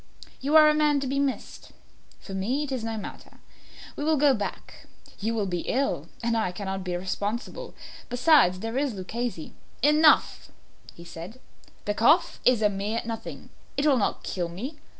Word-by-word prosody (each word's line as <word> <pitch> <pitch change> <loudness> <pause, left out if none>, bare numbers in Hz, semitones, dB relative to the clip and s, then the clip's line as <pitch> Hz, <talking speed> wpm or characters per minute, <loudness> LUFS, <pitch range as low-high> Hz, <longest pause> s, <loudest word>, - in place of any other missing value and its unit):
You 285 +4 0
are 305 -1 +8
a 305 - +5
man 300 -1 +3
to - - -2
be 275 +1 -1
missed. 280 -2 -3 0.5
For 195 - -10
me 235 +10 -1
it 285 - -6
is 255 -4 -2
no 225 -1 -3
matter. 210 - -9 0.6
We - - -4
will 310 0 +2
go 285 -1 +5
back; 205 -4 -6 0.3
you 225 +3 -1
will 210 -3 0
be 175 -2 -2
ill, 275 +2 -1
and 230 0 +1
I 220 -5 0
cannot 190 0 -4
be 180 -1 -2
responsible. 210 - -4 0.3
Besides, 245 - +4
there 225 +3 -2
is 275 -6 -1
Luchesi 205 -1 -4 0.2
" - - -32
"Enough," 300 +1 +4 0.5
he 170 - -12
said; 170 +8 -9 0.5
"the 205 - 0
cough 240 +11 +3
is 245 -4 +4
a - - +6
mere 205 +3 -2
nothing; 225 -1 -7 0.3
it 280 - +1
will 290 -3 +5
not 205 - -1
kill 175 -2 -3
me. 250 - -7
230 Hz, 180 wpm, -26 LUFS, 195-280 Hz, 0.6 s, are